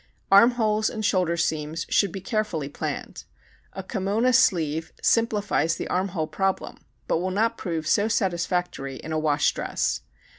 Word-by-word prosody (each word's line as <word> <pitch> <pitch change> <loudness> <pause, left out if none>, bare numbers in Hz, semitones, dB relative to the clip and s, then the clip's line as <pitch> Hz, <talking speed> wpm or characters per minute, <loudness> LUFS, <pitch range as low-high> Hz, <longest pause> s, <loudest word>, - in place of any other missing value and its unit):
Arm 200 +5 +8
holes 215 -2 +1
and 215 -2 -4
shoulder 180 -4 +1
seams 160 0 -1
should 200 -3 +2
be 195 - -6
carefully 205 - -2
planned. 140 - -5 0.5
A 190 - -6
kimona 210 +5 0
sleeve 160 -6 +2
simplifies 205 -8 +1
the - - -5
arm 185 +2 0
hole 170 -4 -2
problem 190 +4 -2 0.3
but - - +1
will 185 +2 -1
not 225 +5 +1
prove 165 -6 -4
so 205 +7 +2
satisfactory 180 -8 -1
in 160 - -8
a 155 - 0
wash 150 -1 +2
dress. - - -2
185 Hz, 155 wpm, -25 LUFS, 160-210 Hz, 0.5 s, Arm